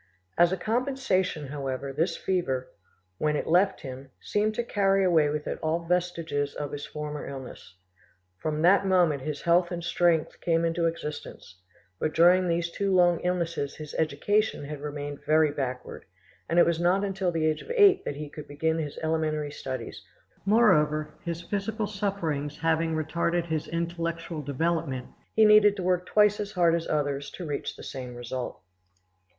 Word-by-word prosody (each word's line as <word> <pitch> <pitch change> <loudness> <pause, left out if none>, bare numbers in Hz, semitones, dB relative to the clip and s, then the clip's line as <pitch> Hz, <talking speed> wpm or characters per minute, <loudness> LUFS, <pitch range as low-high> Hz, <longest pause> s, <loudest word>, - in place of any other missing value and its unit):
As 175 0 +5
a 190 - 0
compensation, 215 - -1
however, 135 -1 -4
this 165 +6 0
fever, 135 -9 -1 0.5
when 150 0 +1
it - - -1
left 185 +4 +3
him, 130 0 -8
seemed 215 +1 0
to 240 - -1
carry 195 -3 +2
away 160 -5 +4
with 150 0 -3
it - - -4
all 165 +2 -1
vestiges 165 -5 -1
of 145 -1 -4
his 145 0 -6
former 150 -1 -5
illness. 130 -8 -9 0.6
From 155 0 -2
that 195 +3 +6
moment 175 -7 +3
his 145 +1 -5
health 175 +1 +3
and 175 -1 -5
strength 170 -2 +1
came 165 -1 +2
into 165 0 +1
existence; 150 - -7 0.4
but 155 - -1
during 180 +2 +5
these 170 0 0
two 200 +2 -1
long 175 -2 +4
illnesses 170 -5 -2
his 155 -1 -9
education 160 +5 0
had 145 0 -7
remained 145 -1 -6
very 155 0 +3
backward, 130 -3 -5 0.4
and 170 - 0
it 175 - +7
was 170 -1 +1
not 180 +3 +3
until 190 -2 -1
the 165 -2 0
age 155 -1 +1
of - - -13
eight 400 -4 +6
that 145 - -4
he 150 +1 -6
could 150 +1 -10
begin 160 +3 -1
his 150 -3 -4
elementary 155 -2 -1
studies; 130 -4 -6 0.4
moreover, 155 -9 +3
his 170 0 -4
physical 210 +3 -2
sufferings 195 -8 -2
having 165 0 +1
retarded 170 +2 0
his 160 -2 -2
intellectual 170 -1 -3
development, 145 -2 -2 0.3
he 220 - +6
needed 210 -1 +7
to 190 - -4
work 180 0 +1
twice 210 -1 +4
as 205 0 -4
hard 175 -2 +3
as 170 -1 -1
others 145 -2 -1
to 180 - -8
reach 145 -2 -4
the - - -11
same 125 -2 -7
result. 120 -1 -5
165 Hz, 170 wpm, -27 LUFS, 150-180 Hz, 0.6 s, it